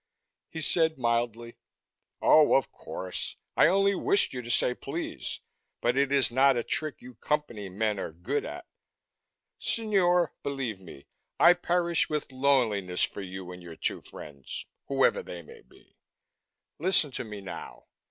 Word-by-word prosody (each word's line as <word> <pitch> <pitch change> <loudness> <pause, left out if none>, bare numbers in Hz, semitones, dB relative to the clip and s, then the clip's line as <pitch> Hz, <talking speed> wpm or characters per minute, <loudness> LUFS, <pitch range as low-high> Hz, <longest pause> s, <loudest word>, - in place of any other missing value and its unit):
He 160 - -6
said 160 0 +2
mildly, 120 -1 -1 0.7
"Oh, 155 -1 +6
of 135 - +2
course. 90 0 -6 0.2
I - - +6
only 195 +1 +3
wished 200 +1 +1
you 125 - -4
to 120 - -9
say 125 +1 +2
'please' 150 +7 -5 0.4
but 120 +1 +1
it 140 0 +2
is 135 -3 +4
not 135 +1 +4
a 120 - 0
trick 155 +4 -2
you 125 0 -10
Company 120 -9 -2
men 105 +2 -1
are - - -4
good 85 +3 -2
at. - - -7 0.9
Signore, 180 -7 +2
believe 135 -8 -3
me, 80 -6 -12 0.3
I 175 - +8
perish 175 -1 +1
with 150 -3 -3
loneliness 120 -9 +2
for - - -2
you 95 -1 -7
and 90 0 -9
your 85 -2 -10
two - - -2
friends, 70 -3 -9 0.2
whoever - - +3
they 85 -1 -8
may - - -14
be. - - -24 0.8
Listen 165 -3 +3
to - - -4
me, 105 -3 -7
now." 90 -10 -9
125 Hz, 150 wpm, -28 LUFS, 100-155 Hz, 0.9 s, I